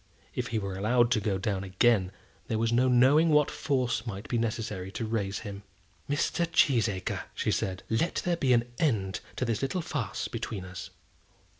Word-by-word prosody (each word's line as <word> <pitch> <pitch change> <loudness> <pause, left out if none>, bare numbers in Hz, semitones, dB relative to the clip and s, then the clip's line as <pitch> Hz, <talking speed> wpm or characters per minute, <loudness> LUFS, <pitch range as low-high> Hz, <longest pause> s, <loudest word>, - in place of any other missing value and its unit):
If - - -2
he 115 - -2
were 100 -2 -3
allowed 120 +4 +2
to 115 - +3
go 105 -2 0
down 95 -1 -2
again, 95 0 +2 0.4
there 110 - -1
was 115 +1 +1
no 125 +2 +4
knowing 130 +6 +5
what 150 -2 +4
force 125 -5 -1
might 100 -1 -5
be 120 - 0
necessary 110 -4 -3
to 115 - -3
raise 105 -3 -1
him. 100 -2 -7 0.5
"Mr. 165 +4 +1
Cheesacre," 115 - +2
she - - 0
said, 95 -1 -2
"let 115 +10 0
there 175 -1 +2
be 135 -6 +1
an 120 -1 +5 0.2
end 105 - +1 0.2
to 125 - -1
this 115 -3 -1
little 135 +6 -1
farce 145 - -3
between 95 -4 -5
us." 90 0 -8
115 Hz, 180 wpm, -29 LUFS, 100-130 Hz, 0.5 s, knowing